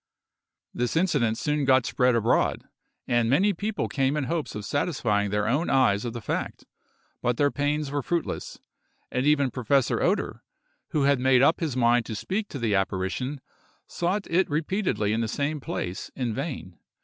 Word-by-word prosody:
This 120 +4 -1
incident 145 -11 +2
soon 150 0 0
got 130 -2 +4
spread 125 -2 +2
abroad, 115 0 +1 0.4
and 120 -1 +2
many 190 - +3
people 205 +4 -2
came 135 +1 0
in 150 - 0
hopes 160 -1 -3
of 105 -1 -5
satisfying 115 - 0
their 105 +1 0
own 145 +9 +1
eyes 125 -6 +3
of 120 - -3
the 120 - -6
fact, - - -3 0.6
but 120 -1 0
their 145 -1 +3
pains 145 0 -1
were 145 0 -1
fruitless; 170 +5 -3 0.5
and 125 +3 0
even 140 -3 +3
Professor 130 +2 +1
Oeder, - - 0 0.5
who 150 - 0
had 140 -1 +3
made 130 0 +4
up 160 - +4
his 150 -7 -2
mind 120 -1 +3
to 110 - -4
speak 200 - -2
to 145 - -7
the 115 -5 0
apparition, 95 +8 -1 0.4
sought 185 +4 -2
it 180 +3 +2
repeatedly 155 - 0
in 115 - 0
the 115 - -1
same 145 +6 -2
place 90 -8 -4
in 125 -4 -2
vain. 130 - -5
135 Hz, 175 wpm, -26 LUFS, 115-150 Hz, 0.6 s, got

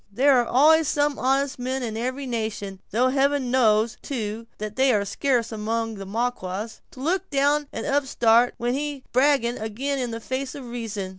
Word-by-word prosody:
There 260 +4 +4
are 240 - -4
always 310 +4 +5
some 290 0 +1
honest 270 +1 +1
men 260 +1 -2
in 225 -2 -4
every 255 +4 -3
nation, 215 -5 -4
though 245 +5 +2
heaven 275 -1 +1
knows, 225 -3 +3
too, 230 -3 -4
that 210 0 -5
they 265 0 +4
are 205 -3 +1
scarce 240 +3 0
among 225 +1 -2
the 195 -2 -8
Maquas, 215 -1 -3
to - - -15
look 360 +7 -1
down 285 +1 +2
an - - -5
upstart 245 -4 +3
when 240 +1 -1
he 285 -1 -3
brags 275 0 +3
ag'in 245 +3 -2
the 230 0 -5
face 260 +3 -4
of 275 -3 -8
reason. 225 -5 -5
245 Hz, 175 wpm, -24 LUFS, 225-275 Hz, -, always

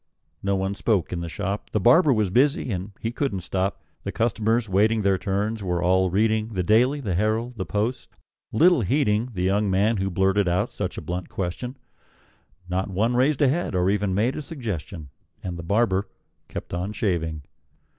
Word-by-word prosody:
No 100 0 0
one 95 +1 -1
spoke 100 -3 0
in 85 - -2
the 85 0 -4
shop: 100 +5 -4
The 110 - +2
barber 140 - +5
was 105 -6 +1
busy, 130 +2 +2
and 95 +1 -4
he 115 - -2
couldn't 120 -7 -2
stop; 95 +3 -2 0.2
The - - -3
customers, 115 0 +1
waiting 105 +3 +2
their 95 -1 +2
turns, 100 +4 -1
were 90 -3 -1
all 95 +1 +3
reading 110 +3 +1
The 90 - 0
"Daily," 125 +9 +3
the 100 -8 -2
"Herald," 110 +6 0
the 95 - -4
"Post," 110 +5 -2 0.4
little 170 +5 +5
heeding 110 0 +1
The 90 -2 -2
young 100 +2 +2
man 105 +4 +2
who 95 0 -1
blurted 95 +2 +2
out 90 +1 0
such - - -4
a - - -4
blunt 90 0 -4
question; 110 +8 -4 0.9
Not 95 +2 -1
one 110 +6 +1
raised 135 +4 +2
a - - +5
head, 150 - 0
or 90 +1 +2
even 100 -2 0
made 115 +7 +1
a - - -4
suggestion; 105 - -6 0.3
And 90 -1 -4
the 85 - -6
barber 100 +1 +1 0.4
kept - - -7
on 90 +4 -2
shaving. 80 -8 -1
100 Hz, 185 wpm, -24 LUFS, 95-115 Hz, 0.9 s, barber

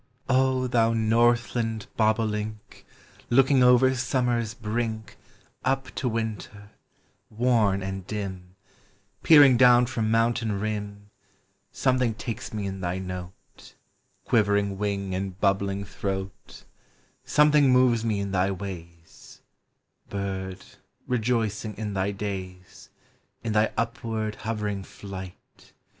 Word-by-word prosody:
Oh, 130 -1 +2
thou 115 -2 +2
northland 115 0 +1
bobolink, 110 -1 -1 0.4
Looking 135 +2 +4
over 125 +1 +5
Summer's 120 -3 -1
brink 110 -1 -4 0.5
Up 130 -2 -1
to 125 - -2
Winter, 110 -2 -5 0.6
worn 110 -4 +1
and 95 -1 -5
dim, 95 -3 -6 0.7
Peering 145 -6 +7
down 125 -1 +6
from 115 -3 -2
mountain 115 -2 +1
rim, 105 -1 -5 0.6
Something 130 -4 +1
takes 115 0 -6
me 105 -2 -4
in 95 -1 -5
thy 90 0 -2
note, 90 -1 -9 0.5
Quivering 100 -3 +1
wing, 100 -2 -2
and 95 0 -4
bubbling 100 0 0
throat; 95 -1 -6 0.6
Something 150 -2 +4
moves 125 -3 +4
me 110 -3 0
in 100 -1 -4
thv 95 0 0
wavs 85 -4 -10 0.3
— - - -42
Bird, 95 -1 -5 0.4
rejoicing 110 -3 -1
in 105 -1 -4
thy 95 0 0
days, 95 -3 -7 0.5
In 115 -2 -2
thy 105 +1 +2
upward 115 -2 -2
hovering 105 -3 -3
flight. 95 -2 -11
110 Hz, 110 wpm, -26 LUFS, 100-120 Hz, 0.7 s, Peering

